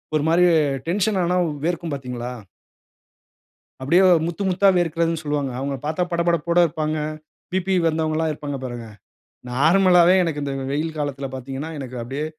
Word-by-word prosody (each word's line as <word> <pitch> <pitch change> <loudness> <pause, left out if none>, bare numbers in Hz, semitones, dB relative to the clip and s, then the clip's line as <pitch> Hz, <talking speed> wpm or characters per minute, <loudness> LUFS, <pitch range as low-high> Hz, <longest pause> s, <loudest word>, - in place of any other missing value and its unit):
ஒரு 150 - +1
மாரி 175 +2 +4 0.4
டென்ஷன் 200 +3 +1
ஆனா 180 +1 +1 0.3
வேர்க்கும் 170 -1 -2
பார்த்தீங்களா? 125 -2 -5 1.5
அப்பிடியே 170 +8 +3 0.2
முத்து 175 +4 -4
முத்தா 195 +2 +3
வேர்க்கிறதுன்னு 165 -1 0
சொல்வாங்க. 145 -2 -1
அவுங்களப் 135 0 -4
பார்த்தா 160 +4 -1
படபடப்போட 170 0 +1
இருப்பாங்க. 155 0 -2 0.5
பிபி 190 0 0
வந்தவங்கல்லாம் 160 0 0
இருப்பாங்க 145 -2 -5
பாருங்க. 120 -2 -6 0.7
நார்மலாவே 180 +5 +5
எனக்கு 155 -3 -2
இந்த 140 - -3 0.2
வெயில் 160 +2 -2
காலத்தில 140 -2 -3
பார்த்தீங்கன்னா, 135 +4 -6
எனக்கு 130 -2 -7
அப்படியே 135 +6 -4
155 Hz, 130 wpm, -22 LUFS, 140-170 Hz, 1.5 s, நார்மலாவே